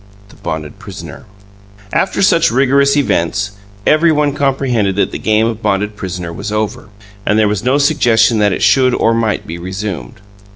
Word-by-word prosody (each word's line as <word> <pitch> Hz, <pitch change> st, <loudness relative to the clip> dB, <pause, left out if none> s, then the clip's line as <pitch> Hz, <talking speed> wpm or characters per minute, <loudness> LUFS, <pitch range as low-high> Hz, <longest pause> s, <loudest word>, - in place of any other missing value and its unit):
THE -, -, -17 dB
BONDED 80 Hz, +4 st, -6 dB
PRISONER 95 Hz, -3 st, -10 dB, 0.7 s
After 195 Hz, -, +1 dB
such 165 Hz, -3 st, +4 dB
rigorous 140 Hz, +3 st, +3 dB
events, 105 Hz, -, 0 dB, 0.3 s
every 160 Hz, +2 st, +4 dB
one 150 Hz, -2 st, +1 dB
comprehended 130 Hz, -8 st, 0 dB
that 100 Hz, -, 0 dB
the -, -, -5 dB
game 110 Hz, 0 st, +2 dB
of 115 Hz, -1 st, -3 dB
bonded 105 Hz, +1 st, -1 dB
prisoner 90 Hz, -4 st, -5 dB
was 105 Hz, -, -6 dB
over, 105 Hz, -1 st, -3 dB, 0.3 s
and 105 Hz, -, +1 dB
there 110 Hz, -1 st, +3 dB
was 105 Hz, 0 st, -2 dB
no 130 Hz, +3 st, +2 dB
suggestion 120 Hz, -6 st, +3 dB
that 105 Hz, -1 st, +3 dB
it -, -, -2 dB
should 130 Hz, -2 st, +4 dB
or 115 Hz, -, +2 dB
might 115 Hz, -3 st, -1 dB
be 85 Hz, +2 st, -7 dB
resumed. 95 Hz, -, -5 dB
110 Hz, 170 wpm, -15 LUFS, 100-135 Hz, 0.7 s, such